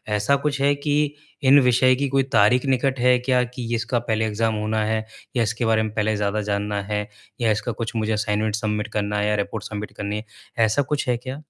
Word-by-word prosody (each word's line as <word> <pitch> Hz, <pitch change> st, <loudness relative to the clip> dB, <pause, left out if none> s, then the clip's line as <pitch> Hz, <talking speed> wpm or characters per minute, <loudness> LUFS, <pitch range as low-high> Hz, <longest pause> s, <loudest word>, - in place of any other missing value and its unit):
ऐसा 105 Hz, +7 st, +2 dB
कुछ 140 Hz, 0 st, -2 dB
है 140 Hz, +1 st, +4 dB
कि 145 Hz, 0 st, 0 dB, 0.3 s
इन 140 Hz, +2 st, +7 dB
विषय 125 Hz, 0 st, +4 dB
की 140 Hz, +2 st, -1 dB
कोई 135 Hz, 0 st, +2 dB
तारीख 110 Hz, +5 st, +4 dB
निकट 130 Hz, 0 st, +1 dB
है 125 Hz, +1 st, +4 dB
क्या 125 Hz, 0 st, +2 dB
कि 125 Hz, -1 st, -6 dB
इसका 120 Hz, +1 st, -1 dB
पहले 110 Hz, -2 st, -1 dB
एग्जाम 110 Hz, +1 st, 0 dB
होना 110 Hz, +1 st, -1 dB
है 110 Hz, +1 st, 0 dB, 0.4 s
या 120 Hz, -, +3 dB
इसके 115 Hz, +2 st, -1 dB
बारे 110 Hz, -1 st, +3 dB
में 110 Hz, -1 st, -4 dB
पहले 110 Hz, 0 st, 0 dB
ज़्यादा 105 Hz, +1 st, -1 dB
जानना 100 Hz, 0 st, -2 dB
है 105 Hz, 0 st, -3 dB, 0.3 s
या 115 Hz, -2 st, +3 dB
इसका 110 Hz, +3 st, -1 dB
कुछ 115 Hz, +1 st, -5 dB
मुझे 110 Hz, 0 st, 0 dB
असाइनमेंट 105 Hz, 0 st, 0 dB
सबमिट 105 Hz, 0 st, -2 dB
करना 105 Hz, 0 st, -1 dB
है 105 Hz, -, +1 dB
या 105 Hz, -, +1 dB
रिपोर्ट 105 Hz, +1 st, -3 dB
सबमिट 105 Hz, 0 st, -6 dB
करनी 105 Hz, +1 st, -3 dB
है। 105 Hz, -, -7 dB, 0.4 s
ऐसा 110 Hz, +6 st, +1 dB
कुछ 140 Hz, 0 st, -2 dB
है 120 Hz, -, +2 dB
क्या? 130 Hz, +4 st, -7 dB
110 Hz, 225 wpm, -23 LUFS, 105-130 Hz, 0.4 s, इन